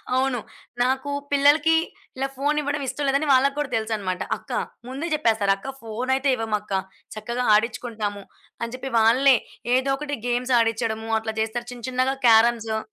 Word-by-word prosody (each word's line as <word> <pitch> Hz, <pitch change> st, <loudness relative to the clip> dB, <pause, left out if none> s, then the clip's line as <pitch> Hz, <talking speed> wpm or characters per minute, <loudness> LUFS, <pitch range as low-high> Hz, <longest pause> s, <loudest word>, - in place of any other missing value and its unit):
అవును. 260 Hz, -1 st, +1 dB, 0.4 s
నాకు 265 Hz, +2 st, 0 dB, 0.2 s
పిల్లలకి 290 Hz, +3 st, +4 dB, 0.4 s
ఇలా 270 Hz, +1 st, -1 dB
ఫోనివ్వడం 290 Hz, +1 st, 0 dB
ఇష్టం 275 Hz, +3 st, -3 dB
లేదని 275 Hz, +3 st, +1 dB
వాళ్ళకి 275 Hz, +2 st, +3 dB
కూడా 295 Hz, -2 st, -1 dB
తెలుసన్నమాట. 215 Hz, -5 st, -2 dB, 0.2 s
అక్కా -, -, -5 dB, 0.3 s
ముందే 270 Hz, +6 st, -4 dB
చెప్పేస్తారు 225 Hz, -9 st, +2 dB
"అక్క 265 Hz, -, -8 dB
ఫోనయితే 255 Hz, +5 st, -1 dB
ఇవ్వమక్క. 215 Hz, -3 st, -3 dB, 0.4 s
చక్కగా 235 Hz, +3 st, -3 dB
ఆడిచ్చుకుంటాము" 215 Hz, -2 st, -1 dB, 0.4 s
అని 235 Hz, 0 st, -3 dB
జెప్పి 265 Hz, +1 st, -6 dB
వాళ్ళే 255 Hz, +5 st, +5 dB, 0.4 s
ఏదో 260 Hz, +1 st, +1 dB
ఒకటి 290 Hz, 0 st, -4 dB
గేమ్స్ 245 Hz, +1 st, 0 dB
ఆడిచ్చడము 225 Hz, -1 st, -1 dB
అట్లా 220 Hz, 0 st, -4 dB
జేస్తారు. 225 Hz, +2 st, -2 dB
చిన్న, 245 Hz, -2 st, -8 dB
చిన్నగా 255 Hz, +1 st, 0 dB
క్యారమ్సు. 225 Hz, -1 st, +4 dB
245 Hz, 140 wpm, -24 LUFS, 225-270 Hz, 0.4 s, వాళ్ళే